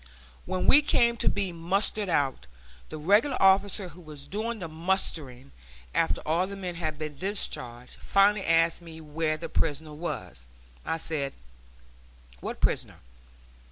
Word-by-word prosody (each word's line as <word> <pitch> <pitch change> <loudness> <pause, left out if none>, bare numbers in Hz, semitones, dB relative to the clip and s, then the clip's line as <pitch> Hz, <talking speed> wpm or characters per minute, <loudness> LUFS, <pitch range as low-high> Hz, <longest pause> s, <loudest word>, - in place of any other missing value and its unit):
When 185 0 -1
we 290 - +8
came 235 -5 +3
to - - +2
be 200 -2 -1
mustered 190 +4 0
out, 135 - 0 0.4
the 155 - -6
regular 205 - +3
officer 195 0 +4
who 180 - -14
was 150 -3 -10
doing 220 +5 -3
the 180 -5 -5
mustering, 155 -6 -1 0.4
after - - +1
all 170 +4 +1
the 200 - -6
men 185 -2 -4
had 155 -3 -3
been 150 -2 -6
discharged, 125 - -3
finally 195 0 +3
asked 165 0 +3
me 165 -1 -10
where 155 0 -1
the 165 +1 -6
prisoner 155 -1 -1
was. 150 - -6 0.4
I 160 - -1
said, 150 -4 -2 1.1
"What - - -5
prisoner?" - - 0
165 Hz, 145 wpm, -28 LUFS, 155-195 Hz, 1.1 s, we